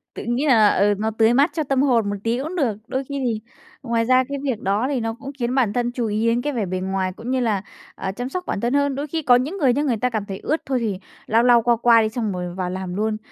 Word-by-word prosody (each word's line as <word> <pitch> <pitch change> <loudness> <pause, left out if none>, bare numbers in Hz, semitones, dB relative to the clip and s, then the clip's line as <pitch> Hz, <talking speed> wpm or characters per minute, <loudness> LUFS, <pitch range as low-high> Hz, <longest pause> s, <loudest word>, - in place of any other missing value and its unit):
Tự - - -6
nghĩ 240 +5 -1
là, 220 -6 +6
ờ, 205 +1 +3
nó 220 +2 -1
tưới 225 +1 +3
mát 280 +6 +4
cho 315 - -1
tâm 270 -1 +1
hồn 235 -7 +2
một 205 - -2
tí 230 +1 0
cũng 335 +4 -5
được, 240 - 0
đôi 265 +1 -2
khi 280 +1 -5
thì 220 -3 -1 0.4
ngoài 230 -2 0
ra 255 +1 +4
cái 280 - -3
việc 260 -6 -1
đó 205 +6 0
thì 275 - 0
nó 225 -1 -2
cũng 275 +4 -8
khiến 240 +1 -1
bản 240 -7 +2
thân 240 -1 0
chú 240 -2 -2
ý 215 +2 0
đến 235 +1 +2
cái 290 +1 -2
vẻ 225 -4 -1
bề 185 0 -3
ngoài 190 0 -1
cũng 235 +4 -6
như 260 - +1
là, 220 -6 0 0.3
à, 190 - -4
chăm 245 +6 -5
sóc 365 +5 -4
bản - - -2
thân 240 +3 0
hơn. 285 -1 +1
Đôi 290 +2 -3
khi 320 +3 -2
có 255 -5 +5
những 290 +11 -1
người 265 -7 +3
nha, 285 - 0
người 250 -6 0
ta 250 +3 0
cảm 215 -3 -3
thấy 195 -1 -6
ướt 310 +2 -1
thôi 260 -2 0
thì 210 -5 -2 0.3
lau 225 +2 +3
lau, 240 -1 +6
qua 240 +1 +3
qua 235 0 +5
đi 215 - 0
xong 220 -3 -2
rồi 180 -1 -5
vào 185 -1 -2
làm 185 -1 -5
luôn, 215 +1 -1
235 Hz, 300 wpm, -22 LUFS, 215-260 Hz, 0.4 s, là